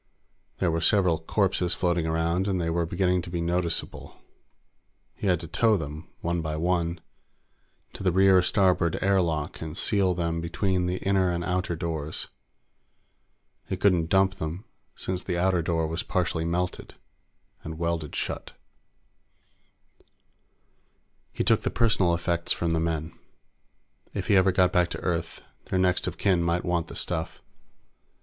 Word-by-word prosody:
There 90 -3 +1
were 80 0 -1
several 90 -2 +3
corpses 90 0 0
floating 85 -2 0
around, 85 +4 0
and 95 -2 0
they 85 -1 -1
were 85 0 0
beginning 90 +1 +1
to 85 - -8
be 85 0 -3
noticeable. 85 0 -2 1.0
He - - -4
had 90 -3 +3
to 85 - -6
tow 110 +5 +3
them, 75 0 -7
one 85 0 -1
by 80 -1 -3
one, 85 0 0 0.9
to - - -9
the 95 -2 +2
rear 95 +1 +5
starboard 90 -2 +2
air 95 0 +4
lock 80 -3 -2
and 80 +2 -5
seal 95 -5 +2
them 85 -1 -1
between 90 +1 0
the 90 +1 -1
inner 95 -2 +2
and 85 0 -1
outer 90 -1 -1
doors. 80 -2 -4 1.4
He 95 - -2
couldn't 90 -4 +2
dump 95 0 +3
them, 80 +4 -5 0.3
since 90 -1 -3
the 90 -2 -3
outer 90 0 +2
door 80 0 0
was 80 +2 -2
partially 85 -3 -1
melted 90 +2 -2 0.7
and 80 0 -6
welded 85 -2 -2
shut. - - -4 2.8
He - - -2
took - - +3
the - - -1
personal 95 -7 +2
effects 85 0 -1
from 85 -1 +1
the 80 - +1
men. 80 -1 -2 1.0
If - - -3
he 100 - +5
ever 95 0 +5
got 90 -1 +3
back 90 -1 +3
to - - -6
Earth, 85 -2 -3 0.2
their - - -1
next 90 -1 +2
of - - -4
kin 95 -4 +2
might 85 +1 0
want 85 -2 0
the - - -9
stuff. 80 -2 -3
85 Hz, 155 wpm, -26 LUFS, 85-95 Hz, 2.8 s, rear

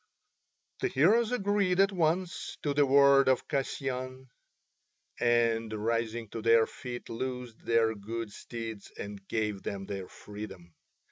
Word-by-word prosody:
The - - +1
heroes 215 - +3
agreed 200 -5 +1
at 195 +1 +5
once 175 0 -1
to 145 - +1
the 145 0 +3
word 140 0 +6
of 130 - +1
Kasyan, 130 -2 -3 0.9
and 115 -2 +2
rising 115 +1 -1
to 115 - -5
their 115 0 +5
feet 120 0 -7
loosed 125 -1 -5
their 115 -1 +3
good 110 +1 -5
steeds 115 -2 -7
and 100 -1 -7
gave 105 -3 -1
them 100 -1 -5
their 95 -2 -5
freedom. 95 -5 -10
120 Hz, 130 wpm, -30 LUFS, 110-140 Hz, 0.9 s, word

